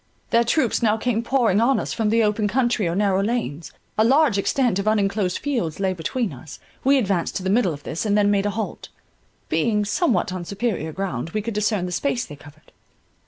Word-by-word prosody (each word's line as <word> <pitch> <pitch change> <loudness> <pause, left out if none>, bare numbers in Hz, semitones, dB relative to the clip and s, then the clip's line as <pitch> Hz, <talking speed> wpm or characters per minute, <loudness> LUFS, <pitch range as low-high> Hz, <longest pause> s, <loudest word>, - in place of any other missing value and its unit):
Their 235 0 +4
troops 240 0 +1
now 220 -1 +3
came 230 -1 0
pouring 235 -5 +2
on 265 +3 +3
us - - -3
from 220 -2 0
the 225 +1 +3
open 210 0 +1
country 235 -4 +1
or 170 - -1
narrow 195 -1 +2
lanes; 200 -8 -2 0.3
a - - +6
large 265 -3 +4
extent 240 -1 +1
of 200 - -3
unenclosed 200 -3 +1
fields 235 - -2
lay 190 -1 +1
between 185 - -2
us; 135 +4 -11 0.3
we 275 +1 +4
advanced 195 -8 0
to 190 - -3
the 190 - 0
middle 210 -4 +3
of 145 -1 -8
this, 165 - -4
and 210 -1 +1
then 205 0 +3
made 200 0 +1
a - - +1
halt: 215 +1 -5 0.6
being 210 -3 +1
somewhat 205 - +1
on 185 -1 -4
superior 195 -4 -2
ground, 165 -6 -4
we 215 - +1
could 230 +1 -3
discern 210 -2 0
the 180 - -5
space 245 +6 -1
they 150 - -10
covered. 145 +2 -17
210 Hz, 210 wpm, -22 LUFS, 185-235 Hz, 0.6 s, a